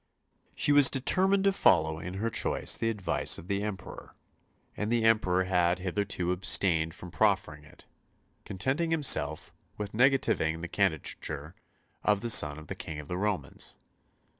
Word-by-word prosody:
She -, -, +1 dB
was 145 Hz, -2 st, +8 dB
determined 190 Hz, +8 st, +2 dB
to 200 Hz, -, +3 dB
follow 80 Hz, -, +2 dB
in 90 Hz, +3 st, -7 dB
her 115 Hz, +4 st, -3 dB
choice -, -, +1 dB
the 115 Hz, -, 0 dB
advice 105 Hz, -4 st, 0 dB
of 85 Hz, -, -12 dB
the 100 Hz, 0 st, -2 dB
Emperor; 105 Hz, -2 st, -8 dB, 0.6 s
and 105 Hz, +1 st, -3 dB
the 120 Hz, -1 st, +1 dB
Emperor 100 Hz, -5 st, +2 dB
had 90 Hz, -1 st, +1 dB
hitherto 90 Hz, -1 st, -3 dB
abstained 90 Hz, -3 st, +1 dB
from 90 Hz, -1 st, -11 dB
proffering 75 Hz, -2 st, 0 dB
it, 75 Hz, -, -19 dB, 0.6 s
contenting 130 Hz, -, -2 dB
himself 130 Hz, -, +1 dB, 0.2 s
with 105 Hz, -1 st, -5 dB
negativing 120 Hz, -, +1 dB
the 90 Hz, -, -5 dB
candidature 80 Hz, -4 st, -3 dB, 0.5 s
of 105 Hz, -1 st, +1 dB
the 120 Hz, -, -2 dB
son 75 Hz, -7 st, +4 dB
of 75 Hz, -, -11 dB
the -, -, -6 dB
King 80 Hz, -2 st, -8 dB
of 75 Hz, -, -11 dB
the 90 Hz, -, -3 dB
Romans. 105 Hz, -1 st, -4 dB
95 Hz, 155 wpm, -28 LUFS, 80-115 Hz, 0.6 s, was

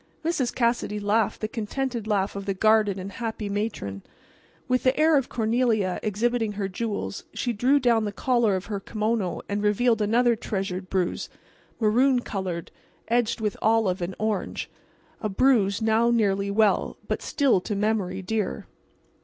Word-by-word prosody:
Mrs. 290 Hz, -7 st, 0 dB
Cassidy 235 Hz, -3 st, 0 dB
laughed 205 Hz, +1 st, +1 dB
the 215 Hz, -, -1 dB
contented 235 Hz, +1 st, -3 dB
laugh 200 Hz, -2 st, 0 dB
of 200 Hz, 0 st, -6 dB
the 195 Hz, -, 0 dB
guarded 215 Hz, -1 st, +3 dB
and 190 Hz, +1 st, -6 dB
happy 220 Hz, -1 st, -4 dB
matron. 200 Hz, -, -3 dB, 0.7 s
With 255 Hz, 0 st, +2 dB
the 260 Hz, +3 st, +2 dB
air 315 Hz, 0 st, +5 dB
of 270 Hz, -3 st, +1 dB
Cornelia 225 Hz, -4 st, +1 dB
exhibiting 225 Hz, +1 st, 0 dB
her 200 Hz, -1 st, -2 dB
jewels, 200 Hz, +1 st, -4 dB
she 245 Hz, -, -1 dB
drew 255 Hz, +7 st, +3 dB
down 235 Hz, -4 st, +2 dB
the 205 Hz, -, -2 dB
collar 235 Hz, -2 st, +2 dB
of 185 Hz, +1 st, -4 dB
her 205 Hz, -2 st, -3 dB
kimono 215 Hz, -2 st, -2 dB
and 205 Hz, 0 st, -2 dB
revealed 220 Hz, +2 st, +2 dB
another 235 Hz, +3 st, +3 dB
treasured 190 Hz, -3 st, -4 dB
bruise, 185 Hz, -2 st, -1 dB, 0.5 s
maroon 245 Hz, +4 st, +3 dB
colored, 185 Hz, -6 st, -4 dB, 0.4 s
edged 235 Hz, -1 st, +1 dB
with 210 Hz, -2 st, -1 dB
olive 215 Hz, -4 st, +2 dB
and 175 Hz, +2 st, -3 dB
orange—a 215 Hz, +1 st, -5 dB
bruise 210 Hz, -2 st, +2 dB
now 225 Hz, +2 st, +3 dB
nearly 200 Hz, -4 st, +1 dB
well, 210 Hz, +1 st, +2 dB
but -, -, -2 dB
still 270 Hz, -10 st, +2 dB
to 205 Hz, -, -3 dB
memory 200 Hz, -3 st, -1 dB
dear. 210 Hz, +1 st, -2 dB
215 Hz, 155 wpm, -25 LUFS, 200-235 Hz, 0.7 s, air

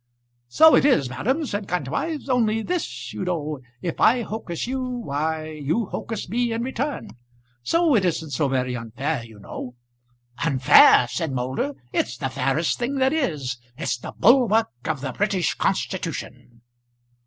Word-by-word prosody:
"So 315 Hz, -, +6 dB
it -, -, +4 dB
is, 155 Hz, -, +3 dB
ma'am," 265 Hz, -, -1 dB
said 205 Hz, -5 st, -4 dB
Kantwise, 180 Hz, -, -2 dB
"only 225 Hz, -4 st, +1 dB
this, 355 Hz, +3 st, -4 dB
you -, -, -4 dB
know, 155 Hz, -5 st, -2 dB, 0.2 s
if 170 Hz, -, -3 dB
I 240 Hz, +1 st, +5 dB
hocus 210 Hz, -7 st, -4 dB
you, 260 Hz, +2 st, -2 dB
why 160 Hz, -, -3 dB
you 155 Hz, +9 st, -1 dB
hocus 225 Hz, -3 st, -4 dB
me 235 Hz, +4 st, 0 dB
in 230 Hz, +1 st, -2 dB
return; 265 Hz, +3 st, -3 dB, 0.5 s
so 330 Hz, -, +2 dB
it 210 Hz, -6 st, +3 dB
isn't 160 Hz, -4 st, -1 dB
so 140 Hz, +2 st, +1 dB
very 130 Hz, -1 st, -1 dB
unfair, 125 Hz, +4 st, -3 dB
you 115 Hz, -2 st, -13 dB
know." 125 Hz, +4 st, -8 dB, 0.7 s
"Unfair!" 130 Hz, -4 st, +6 dB
said 160 Hz, +4 st, -3 dB
Moulder. 130 Hz, +2 st, -2 dB, 0.2 s
"It's 120 Hz, +1 st, -1 dB
the 135 Hz, +1 st, -2 dB
fairest 135 Hz, +5 st, 0 dB
thing 245 Hz, +3 st, -1 dB
that 265 Hz, +1 st, +2 dB
is. 145 Hz, -, -1 dB, 0.2 s
It's 150 Hz, -, -1 dB
the 125 Hz, -, -8 dB
bulwark 225 Hz, -2 st, +4 dB
of 155 Hz, -4 st, -2 dB
the 135 Hz, -2 st, -3 dB
British 195 Hz, -4 st, 0 dB
Constitution." 120 Hz, -1 st, -3 dB
165 Hz, 155 wpm, -23 LUFS, -, 0.7 s, So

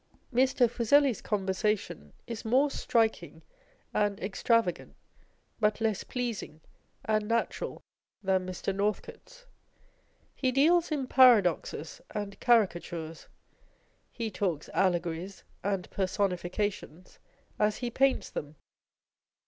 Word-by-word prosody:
Mr, 260 Hz, 0 st, +4 dB
Fuseli's 245 Hz, +2 st, +3 dB
conversation 195 Hz, -, -2 dB
is 230 Hz, -1 st, -6 dB
more 260 Hz, +5 st, +3 dB
striking 220 Hz, -12 st, 0 dB, 0.5 s
and 205 Hz, -1 st, +1 dB
extrava 200 Hz, 0 st, +1 dB
gant, -, -, -16 dB, 0.6 s
but 210 Hz, -1 st, +2 dB
less 220 Hz, -3 st, 0 dB
pleasing 235 Hz, -11 st, -4 dB, 0.5 s
and 215 Hz, -1 st, +1 dB
natural 230 Hz, +1 st, -2 dB, 0.4 s
than 190 Hz, -1 st, +2 dB
Mr. 185 Hz, +1 st, -3 dB
Northcote's. 215 Hz, -, -4 dB, 0.9 s
He 260 Hz, -2 st, 0 dB
deals 330 Hz, +6 st, +3 dB
in 285 Hz, -4 st, -1 dB
paradoxes 210 Hz, -, +3 dB
and 205 Hz, -1 st, -4 dB
caricatures. 175 Hz, -8 st, 0 dB, 0.8 s
He 230 Hz, -2 st, -4 dB
talks 180 Hz, -6 st, -2 dB
allegories 175 Hz, 0 st, -1 dB, 0.2 s
and 195 Hz, -2 st, -1 dB
personifications 185 Hz, -1 st, -2 dB, 0.4 s
as 210 Hz, 0 st, +2 dB
he 245 Hz, -1 st, -3 dB
paints 270 Hz, +2 st, +1 dB
them. 150 Hz, +1 st, -6 dB
210 Hz, 100 wpm, -29 LUFS, 185-240 Hz, 0.9 s, Mr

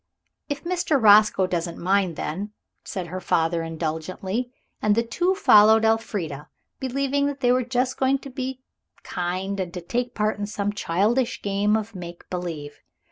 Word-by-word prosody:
"If 285 Hz, 0 st, -4 dB
Mr. 345 Hz, -4 st, +1 dB
Roscoe 210 Hz, -3 st, +6 dB
doesn't 170 Hz, -2 st, -3 dB
mind, 185 Hz, -1 st, +1 dB
then," 200 Hz, +9 st, -4 dB, 0.3 s
said 185 Hz, -2 st, -5 dB
her 185 Hz, +2 st, -4 dB
father 165 Hz, -1 st, +1 dB
indulgently. 165 Hz, +8 st, -3 dB, 0.3 s
And 210 Hz, -1 st, +3 dB
the 230 Hz, -, +2 dB
two 355 Hz, +11 st, 0 dB
followed 220 Hz, -, +6 dB
Elfrida, 185 Hz, -10 st, -1 dB, 0.3 s
believing 275 Hz, +2 st, 0 dB
that 285 Hz, -1 st, -4 dB
they 245 Hz, -, +4 dB
were 255 Hz, +1 st, +3 dB
just 250 Hz, +1 st, -1 dB
going 270 Hz, +1 st, +2 dB
to 275 Hz, 0 st, -11 dB
be 260 Hz, 0 st, -5 dB, 0.4 s
kind 185 Hz, +3 st, -3 dB
and 180 Hz, -2 st, -3 dB
to 180 Hz, -, -4 dB
take 245 Hz, +7 st, -3 dB
part 210 Hz, 0 st, 0 dB
in 205 Hz, -, -2 dB
some 205 Hz, -1 st, -2 dB
childish 210 Hz, +7 st, 0 dB
game 205 Hz, +2 st, +2 dB
of 220 Hz, 0 st, -5 dB
make 175 Hz, -2 st, -9 dB
believe. 165 Hz, -5 st, -5 dB
205 Hz, 160 wpm, -24 LUFS, 180-250 Hz, 0.4 s, Roscoe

